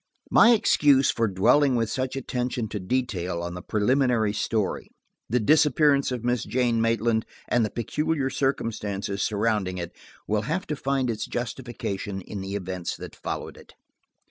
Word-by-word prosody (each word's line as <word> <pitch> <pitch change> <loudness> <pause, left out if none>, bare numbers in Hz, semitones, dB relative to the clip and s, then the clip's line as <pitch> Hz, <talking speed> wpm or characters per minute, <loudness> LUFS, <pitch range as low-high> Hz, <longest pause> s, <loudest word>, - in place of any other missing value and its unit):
My 235 - +7
excuse 145 - +4
for 115 -1 0
dwelling 125 +8 +3
with 115 -2 0
such 130 0 -2
attention 125 -2 -2
to 105 - -4
detail 95 -5 -2
on 85 0 -4
the 90 - -6
preliminary 115 0 +1
story, 110 -1 -1 0.4
the 125 - +2
disappearance 145 +2 +4
of 125 -2 -3
Miss 120 -1 0
Jane 120 -2 +1
Maitland 115 0 +1 0.2
and 120 - +2
the 110 - 0
peculiar 140 +4 -1
circumstances 105 -7 -2
surrounding 105 -3 0
it, 85 -1 -6 0.3
will 105 0 +1
have 185 +4 -1
to 150 - -3
find 135 -3 0
its 110 -1 -4
justification 115 -5 -4
in 100 +2 -7
the 95 +1 -5
events 90 -3 -4
that - - -9
followed - - -5
it. - - -16
115 Hz, 155 wpm, -25 LUFS, 100-130 Hz, 0.4 s, My